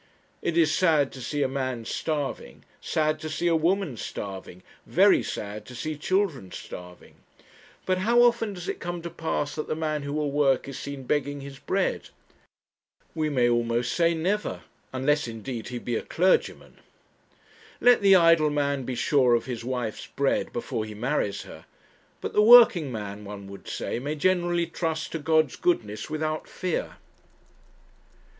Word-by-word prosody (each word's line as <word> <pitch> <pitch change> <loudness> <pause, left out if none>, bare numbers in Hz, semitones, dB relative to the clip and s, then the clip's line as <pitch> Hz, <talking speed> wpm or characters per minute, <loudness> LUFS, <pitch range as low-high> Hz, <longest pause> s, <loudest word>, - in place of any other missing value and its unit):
It 170 -1 -1
is 160 -2 +4
sad 155 -7 +3
to 130 - -10
see 145 +4 -1
a - - +2
man 130 -3 -3
starving 145 - -4 0.2
sad 155 0 0
to 155 - -5
see 155 - -3
a 170 -1 +4
woman 170 - +1
starving 95 -3 -7 0.2
very - - +5
sad 105 +1 -5
to 125 - -10
see 155 +6 -4
children 155 - -1
starving. 90 0 -10 0.7
But 185 0 +1
how 235 +5 +4
often 235 -3 +2
does 180 -1 -8
it - - -3
come 175 0 -5
to 170 - -5
pass 160 -3 -2
that 155 - -4
the - - -1
man 155 -1 -2
who 140 0 -5
will 150 -1 -1
work 140 -2 +2
is 135 -1 -6
seen 140 -1 -6
begging 145 +1 -1
his 135 -1 -9
bread? - - -1 1.0
we 155 -1 -1
may 125 -4 +2
almost 120 +1 +1
say 170 -1 +2
never 190 +6 -2 0.3
unless, 140 +2 +1
indeed, 115 +1 -6
he 125 - -5
be 120 0 -3
a - - -1
clergyman. 185 +3 0 1.0
Let 245 -2 +5
the 195 -1 +7
idle 165 -3 +5
man 140 -2 -1
be 130 - -3
sure 125 -1 +3
of 115 - -1
his 120 -3 -5
wife's 120 -3 -4
bread 140 -1 0
before 115 -2 -3
he 110 -1 -8
marries 105 -4 -1
her; - - -12 0.6
but - - -4
the 210 - +4
working 210 - +7
man, 105 -2 -6
one 100 -1 -8
would 100 - -11
say, - - -3
may 145 +4 -3
generally 175 +1 +1
trust 160 -1 -3
to 165 - -3
God's 155 -2 +2
goodness 110 -12 -1
without 155 0 -2
fear. 180 -3 -3
145 Hz, 165 wpm, -26 LUFS, 125-165 Hz, 1.0 s, the